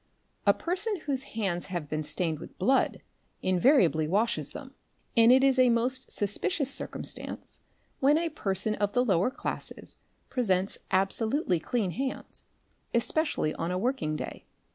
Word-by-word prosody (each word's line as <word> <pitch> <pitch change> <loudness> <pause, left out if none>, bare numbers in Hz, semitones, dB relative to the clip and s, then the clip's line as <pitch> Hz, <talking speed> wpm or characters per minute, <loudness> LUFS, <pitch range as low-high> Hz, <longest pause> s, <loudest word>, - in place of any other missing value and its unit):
A - - +8
person 380 +2 -1
whose 275 -4 -1 0.2
hands 185 -5 -1
have 175 -5 -4
been 155 +1 -2
stained 155 +1 -1
with - - -11
blood, 260 +8 +2 0.4
invariably 185 - +4
washes 210 +8 0
them, - - -10 0.4
and 230 0 +7
it 260 +1 +6
isa 260 -2 +5
most 250 +3 +1
suspicious 265 - 0
circumstance - - -5 0.4
when 285 +3 +4
a 335 0 0
person 205 - -1
of 205 -1 -1
the 250 0 +3
lower 190 0 +3
classes - - -5 0.3
presents 195 -7 0
absolutely 195 - +1
clean 205 +1 -1
hands, 265 +6 -5 0.5
especially 235 - +1
on 165 - -3
a 180 - -1
working 200 - -1
day. - - -6
225 Hz, 140 wpm, -28 LUFS, 180-265 Hz, 0.5 s, A